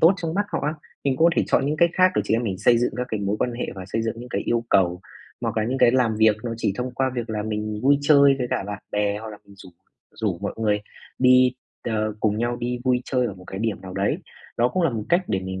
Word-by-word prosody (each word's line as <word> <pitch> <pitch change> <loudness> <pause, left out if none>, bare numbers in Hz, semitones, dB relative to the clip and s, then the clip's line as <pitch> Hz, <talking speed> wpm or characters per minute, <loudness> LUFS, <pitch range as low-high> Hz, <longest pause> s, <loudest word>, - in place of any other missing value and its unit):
tốt 170 +4 +6
trong 165 -2 -4
mắt 205 +1 0
họ - - 0
á, 150 - -1 0.3
mình 135 -2 +1
có 165 +4 +5
thể - - +4
chọn - - +2
những 150 +2 0
cách 170 +1 +4
khác 185 0 +5
để - - +1
chị - - +1
em 115 - +1
mình 95 -5 -3
xây 120 +3 +4
dựng 120 - 0
ra 125 - -1
cái 110 -2 -3
mối 100 +1 -1
quan 125 - 0
hệ 120 - -3
và 95 -1 -7
xây 115 +3 -2
dựng 115 +1 -2
những 125 - -9
cái - - -2
yêu 120 0 0
cầu, 90 -2 +3 0.4
hoặc - - -3
là 110 - +1
những 130 +4 -2
cái 120 - +6
làm 125 -4 +2
việc 110 -1 +4
nó 115 - -2
chỉ 100 - 0
thông 125 +1 -3
qua 130 +1 0
việc 120 -2 -4
là 105 -1 -2
mình 105 0 -3
vui 140 +1 +4
chơi 140 -2 +6
với 125 - -1
cả - - 0
bạn 105 -1 -6
bè 105 0 0
hoặc 110 - -8
là 105 - -9
mình 100 - -17
rủ 95 - -13 0.5
rủ 100 -6 -2
mọi 100 +2 -3
người 105 -2 +1 0.4
đi, 130 0 +5 0.3
ờ, 110 -2 -1
cùng 105 -1 +1
nhau 120 +1 -1
đi 125 +1 -3
vui 125 -1 +2
chơi 125 -2 0
ở 100 - -5
một 90 -1 -14
cái 95 - -7
điểm 110 -1 -2
nào 95 -1 -9
đấy. 100 +1 0 0.4
Đó 120 +1 +3
cũng 185 +4 -1
là 165 - +3
một 110 -3 -4
cách 175 +2 +3
để 95 - 0
mình 95 0 -5
115 Hz, 290 wpm, -23 LUFS, 105-130 Hz, 0.5 s, tốt